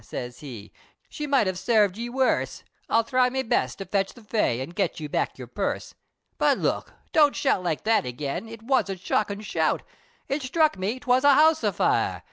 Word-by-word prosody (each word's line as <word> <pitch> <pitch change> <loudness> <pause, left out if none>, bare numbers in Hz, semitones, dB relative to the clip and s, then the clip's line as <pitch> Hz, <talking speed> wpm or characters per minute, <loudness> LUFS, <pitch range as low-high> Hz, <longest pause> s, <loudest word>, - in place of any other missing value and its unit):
siz 120 +2 -7
he, 115 -8 -9 0.4
"She 300 - -5
might 275 -6 +3
have 185 -1 -2
sarved 205 -1 +3
ye 235 +2 -5
worse, 260 +1 0 0.3
I'll 230 - +3
thry 250 +2 +2
me 265 +1 -2
best, 130 - 0
to 195 - -6
ketch 195 -1 -1
the 240 - -15
Fay, 210 - 0
An' 130 +4 -4
get 180 -1 -2
you 155 - -5
back - - -2
yer - - -7
purse. - - -3 0.5
But - - +3
look! - - -2 0.2
don't 295 -3 +5
shout 265 -9 +1
like 170 -4 -2
that 225 +1 +3
again, 140 - -4
It 225 -1 -10
was 245 -4 +1
a 195 - -3
shockin' 200 +2 -1
shout, 210 - 0 0.4
It 275 +2 -1
sthruck 310 +4 +2
me, 200 +7 -3
'twas 255 -1 +2
a 285 -1 +7
house 315 +2 +5
a - - +2
fire! - - +1
220 Hz, 205 wpm, -25 LUFS, 180-260 Hz, 0.5 s, a